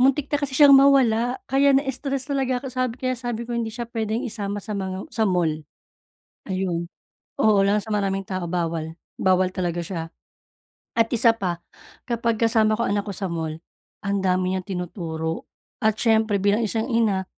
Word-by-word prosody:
Muntik 275 +3 +2
na 290 - +2
kasi 275 -2 -2
siyang 285 -2 +8
mawala, 260 -3 +5
kaya 275 +1 +4
na-stress 270 -1 -2
talaga 260 -2 0
ako. 270 - -8
Sabi 255 -2 0
ko - - -30
kaya 255 - 0
sabi 240 -2 -4
ko, 240 - -6
hindi 235 -1 -1
siya 235 +2 -5
pwedeng 225 +2 -2
isama 205 -3 -3
sa 215 - -4
mga 190 -1 -5
sa 220 -2 +1
mall. 165 -4 +1 0.9
Ayun. 180 -3 -2 0.5
Oo, 210 -2 +4
lalo 200 +2 +3
na - - -5
sa - - -9
maraming 195 -2 -1
tao, 185 -2 -3
bawal. 165 -2 -2 0.2
Bawal 185 0 +2
talaga 175 -2 -1
siya. 165 -1 -5 0.9
At 225 - +5
isa 230 0 +5
pa, 180 -6 -2 0.5
kapag 230 -1 +1
kasama 220 -1 +3
ko 235 - -1
anak 205 -1 0
ko 200 - -4
sa 190 0 -3
mall, 160 -2 -3 0.5
ang 200 -1 0
dami 185 0 +1
niyang 185 - -8
tinuturo. 170 -4 -4 0.3
At 220 -1 +2
siyempre 220 -3 +2
bilang 205 +3 +2
isang 225 +4 -2
ina, 215 -5 +2
210 Hz, 180 wpm, -23 LUFS, 185-235 Hz, 0.9 s, siyang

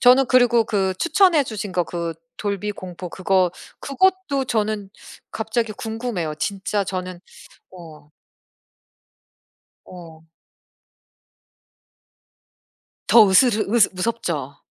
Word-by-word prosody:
저는 255 +1 +6
그리고 245 -3 +4
그 190 -3 -1
추천해 340 -4 +3
주신 210 -4 -6
거 175 -1 0
그 170 -1 -4 0.2
돌비 205 0 -3
공포 180 -2 -8
그거. 185 0 +1 0.3
그것도 290 -2 0
저는 215 -3 -2 0.4
갑자기 220 0 -2
궁금해요. 220 -8 -4
진짜 200 +4 -2
저는 185 -1 -5 0.5
어. 155 -5 -13 1.8
어. 165 -2 -13 2.8
더 220 -3 +7
으스르 215 +1 +3
으스 235 -4 +5
무섭죠? 175 - -3
205 Hz, 190 characters per minute, -21 LUFS, 180-235 Hz, 2.8 s, 더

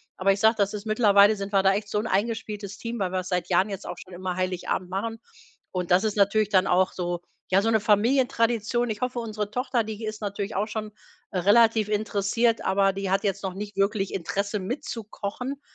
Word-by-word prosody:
Aber 195 +1 +2
ich 195 - 0
sage, 220 +2 +5
das 200 -1 +1
ist 210 0 -6
mittlerweile 215 -1 +5
sind 200 -1 -5
wir 195 -2 +4
da 195 0 +4
echt 205 +1 -3
so 210 - 0
'n 220 - -3
eingespieltes 210 -1 -2
Team, 230 +1 -5
weil 190 -2 -1
wir's 185 -1 -2
seit 180 -1 -2
Jahren 185 +3 +3
jetzt 195 -1 -6
auch - - -6
schon 185 - -12
immer 180 0 -4
Heiligabend 185 0 -2
machen. 225 +4 -3 0.5
Und 180 -2 -3
das 185 +4 +4
ist 215 - -1
natürlich 210 +1 +3
dann 190 -2 +3
auch 185 +1 +2
so 175 -1 -3 0.3
ja, 190 +1 +5
so 225 - +1
'ne 220 -1 +3
Familientradition. 235 +1 +2
Ich 210 -1 -4
hoffe, 250 -1 -1
unsere 215 -3 -4
Tochter, 250 0 0
die 215 +1 -7
ist 215 -1 -4
natürlich 205 0 -4
auch 200 - +1
schon, 215 -1 -5 0.4
äh, - - -4
relativ 220 +2 +4
interessiert, 215 +2 0
aber 195 +1 +3
die 195 -1 -4
hat 195 - +2
jetzt 200 -1 -1
noch 190 -1 -3
nicht 205 +1 -7
wirklich 195 0 0
Interesse 200 +4 -2
mitzukochen. 230 +4 -5
205 Hz, 215 wpm, -26 LUFS, 195-220 Hz, 0.5 s, sage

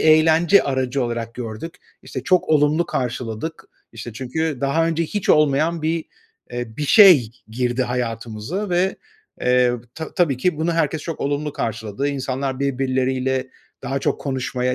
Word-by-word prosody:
eğlence 160 +4 +5
aracı 130 -1 -1
olarak 115 -1 -4
gördük, 125 +8 -6 0.3
işte, 130 - -6
çok 180 +4 +2
olumlu 155 +2 +3
karşıladık, 125 +3 -4 0.3
işte, 115 0 -8
çünkü 135 +5 -3
daha 140 +4 +2
önce 165 0 0
hiç 205 +4 -4
olmayan 155 +2 +3
bir, 160 +1 0 0.5
eee, 120 -2 -5
bir 150 - -2
şey 170 - +7 0.2
girdi 120 +2 -1
hayatımıza 120 - -3
ve, 180 +2 +1 0.4
eee, 125 0 +3 0.2
ta 160 -1 -7
tabii 160 -7 +2
ki 165 +5 0
bunu 165 +2 0
herkes 160 -2 0
çok 165 -3 -5
olumlu 145 +1 -1
karşıladı. 110 +4 -3
İnsanlar 135 -1 -3
birbirleriyle 130 -1 0 0.3
daha 135 - -2
çok - - -1
konuşmaya, 130 -2 -1
135 Hz, 140 wpm, -21 LUFS, 125-160 Hz, 0.5 s, şey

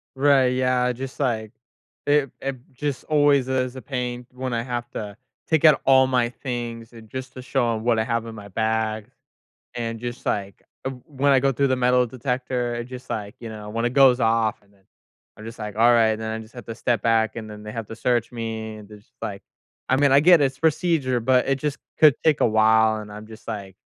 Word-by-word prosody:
Right, 135 -1 +4
yeah, 125 -1 +1
just 130 +2 -7
like 110 -6 -1 0.6
it 145 -2 +3
it 135 -1 -3 0.2
just 140 0 -3
always 145 -3 +3
is 130 -1 -1
a 130 - -7
pain 125 -2 -4
when 130 -1 -4
I 115 0 -1
have 120 -1 -4
to 105 -2 -6 0.3
take 160 -1 +2
out 155 -3 +6
all 130 -1 +6
my 125 -2 +1
things 120 -2 -6
and 110 -2 -13
just 130 +2 -7
to 130 - -8
show 120 -2 0
'em 110 - -5
what 115 -2 +2
I - - +2
have 115 0 -1
in 115 -1 -8
my 105 -1 -10
bag. 110 +1 -1 0.7
And 115 -1 -4
just, 120 0 -6
like 100 -1 -2 0.2
w 130 -2 -5
when 140 -1 +1
I 135 - +6
go 135 0 +2
through 140 +3 +1
the 130 - +1
metal 125 0 +3
detector, 125 0 -2
it 120 - -4
just, 125 +1 -10
like, 105 0 -4
you 115 - -7
know 105 -1 -8
when 115 +2 -2
it 120 - 0
goes 130 -2 +5
off, 115 -2 +1
and 100 0 -28
then 95 -1 -29 0.5
I'm 110 - -11
just 115 0 -9
like, 105 -1 -6
"Alright," 115 -1 +5
and 110 - -7
then 110 - -3
I 110 - -3
just 110 +2 -17
have 120 -3 -9
to 115 - -5
step 115 -1 -1
back, 115 0 +2
and 110 -1 -6
then 105 0 -10
they 105 0 -7
have 115 -2 -5
to 115 - -8
search 120 -1 0
me, 110 -2 -5
and 105 -1 -12
there's, 105 0 -16
like 100 -1 -5 0.5
I 130 - +3
mean, 140 0 +4
I 140 - +7
get 175 +1 +6
it, 145 - +4
it's 135 +1 -6
procedure, 155 -5 +1
but 125 +2 +3
it 135 - +2
just 150 0 -2 0.2
could 155 -3 +7
take 155 -2 +3
a - - +5
while, 110 0 +4
and 105 -1 -10
I'm 105 +1 -9
just 110 0 -13
like, 100 -2 -6
120 Hz, 235 wpm, -23 LUFS, 110-130 Hz, 0.7 s, I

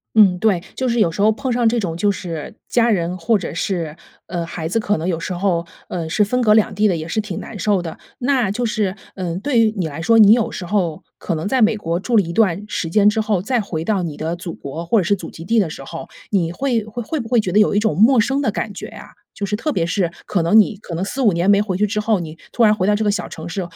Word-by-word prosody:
嗯， 200 -4 +6
对， 205 -6 +2
就 260 - -1
是 235 0 0
有 210 -7 +3
时 200 - -2
候 215 - +5
碰 255 +4 -2
上 240 -1 +3
这 235 +1 +1
种 175 -7 -2
就 205 +4 +2
是 170 -6 -5 0.2
家 235 -1 +3
人 180 -3 0
或 210 +5 +1
者 170 -5 -6
是， 165 -3 -2 0.3
呃， 175 -1 -3
孩 165 -1 -5
子 205 +8 0
可 210 -1 0
能 160 - -4
有 170 -3 -1
时 185 - -4
候 175 -2 0 0.2
呃， 165 -3 -4
是 210 +6 +2
分 250 +5 0
隔 215 -3 +4
两 215 -1 +3
地 210 +2 +3
的， 180 - +1
也 160 0 -5
是 195 +6 -1
挺 205 -5 -5
难 225 - -8
受 205 0 +1
的。 165 -2 -6 0.2
那 250 -5 +1
就 240 +4 -1
是， 210 -4 -1 0.2
嗯， 180 -2 -3
对 240 +3 +1
于 220 -1 +3
你 180 - 0
来 155 +1 -6
说， 225 +5 +4
你 210 -1 +8
有 230 -1 +3
时 180 - -6
候 175 -5 -1 0.2
可 170 - -2
能 160 - -4
在 255 +4 +2
美 220 0 +4
国 170 -4 -2
住 230 +4 0
了 210 - +6
一 170 -2 -5
段 195 -1 +2
时 170 -5 -3
间 205 +3 +4
之 215 +1 +1
后， 215 -4 0
再 245 +5 0
回 165 -6 -4
到 200 0 0
你 160 -4 -4
的 160 +2 -3
祖 175 0 -6
国 160 +4 -7
或 220 +7 +2
者 190 - +1
是 200 +4 +2
祖 180 -4 -7
籍 165 - -10
地 225 +5 +2
的 180 -6 0
时 135 - -8
候， 165 +4 -8 0.2
你 180 -5 +1
会 240 +4 0
会 220 +2 -6
会 310 +6 -3
不 230 - -6
会 240 0 +3
觉 185 -4 -3
得 210 - +5
有 210 - +4
一 - - +5
种 210 -7 +1
陌 235 +7 +5
生 270 +5 +1
的 225 - +1
感 205 0 -4
觉 - - -7
啊？ - - -12 0.2
就 200 - -4
是 205 - -3
特 270 +9 -1
别 170 -8 0
是 175 0 0 0.2
可 180 - 0
能 170 +7 +5
你 215 0 +4
可 175 -5 -7
能 180 - -1
4-5 230 +1 +1
年 170 +3 0
没 200 0 +5
回 195 -4 -2
去 210 +3 +2
之 210 +1 -2
后， 215 -1 +1
你 160 -2 -7
突 235 - +2
然 215 -1 +5
回 190 - -1
到 210 - +3
这 215 - -1
个 205 - +2
小 205 - -3
城 160 +1 -8
市 190 +2 -3
200 Hz, 315 characters per minute, -20 LUFS, 170-220 Hz, 0.3 s, 你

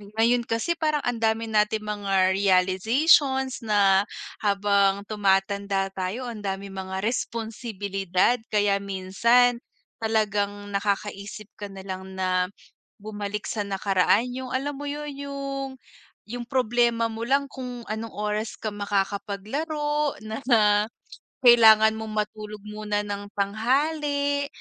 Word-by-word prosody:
ngayon 235 +1 +2
kasi 280 +10 -1
parang 305 -2 +1
ang 245 -1 -1
dami 225 0 0
nating 215 0 +2
mga 195 -3 +1
realizations 225 - +3
na 205 -3 +3 0.3
habang 200 -1 +2
tumatanda 200 -1 0
tayo 190 +6 -4
ang 235 -3 -6
daming 195 -1 -4
mga 190 0 -5
responsibilidad. 220 -3 -1
Kaya 205 -2 +2
minsan, 215 +6 +2 0.4
talagang 205 -2 -1
nakakaisip 200 +1 -3
ka 205 - -5
na 195 -1 -10
lang 190 0 -7
na 185 -1 +1 0.6
bumalik 210 -1 -4
sa 210 -2 -2
nakaraan. 195 +4 +2
Yung 255 0 -6
alam 275 +1 -2
mo 290 - -5
yun 295 0 -4
yung 275 -1 -4 0.6
yung 240 +2 -5
problema 240 -2 +2
mo 225 0 -5
lang 275 +4 +2
kung 250 -3 -7
anong 220 +1 -4
oras 210 +1 -3
ka 215 -2 -4
makakapaglaro, 215 +10 -2
na 220 +4 -5
na 210 -2 +4 0.6
kailangan 220 -2 +7
mong 220 -1 -6
matulog 210 0 -10
muna 210 0 -3
ng 205 0 -5
tanghali, 285 +7 0
215 Hz, 120 wpm, -25 LUFS, 200-245 Hz, 0.6 s, kailangan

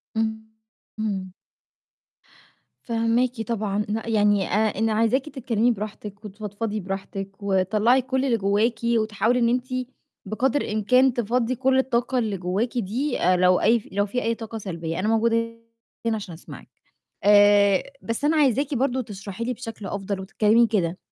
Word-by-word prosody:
إمم، 220 0 -1 0.6
إمم. 195 -4 -3 1.5
فاهماكِ 230 +1 0
طبعًا، 210 -2 -2
ن 220 +1 -1
يعني 205 -3 +2
آآ، 215 +3 +2
أنا 225 0 +1
عايزاكِ 230 +6 +1
تتكلّمي 245 -4 0
براحتِك 210 0 -7
وتفضفضي 210 +1 -4
براحتِك 195 0 -5
وطلّعي 210 +6 +2
كُلّ 260 +1 -1
اللي 240 -4 +2
جواكِ 210 +3 +1
وتحاولي 230 +1 +1
إن 235 -1 +3
أنتِ 250 +1 0 0.6
بِقدر 250 +7 0
الإمكان 250 +5 +3
تفضّي 240 +1 0
كُلّ 260 +1 +2
الطاقة 255 0 0
اللي 215 -5 0
جواكِ 190 +8 -2
دي 245 +6 -1
آآ، 180 +1 +4
لو 180 0 +4
أي 230 +2 +4
ف - - -16
لو 200 +1 +1
في 245 +5 -2
أي 230 +1 0
طاقة 225 0 -7
سلبية 170 -5 -4
أنا 200 - -1
موجودة 230 +1 +1 0.5
هنا 225 -1 +1
عشان 200 -5 -6
أسمعِك، 160 - -12 0.5
آآ، 205 -1 +5 0.2
بس 230 +5 -3
أنا 315 +1 +3
عايزاكِ 280 0 +2
برضه 260 0 0
تشرحي 205 0 -7
لي 250 - -1
بشكل 225 -3 -8
أفضل 195 0 -4
وتتكلّمي 215 +4 +3
كده 185 -5 0
220 Hz, 150 wpm, -24 LUFS, 200-240 Hz, 1.5 s, آآ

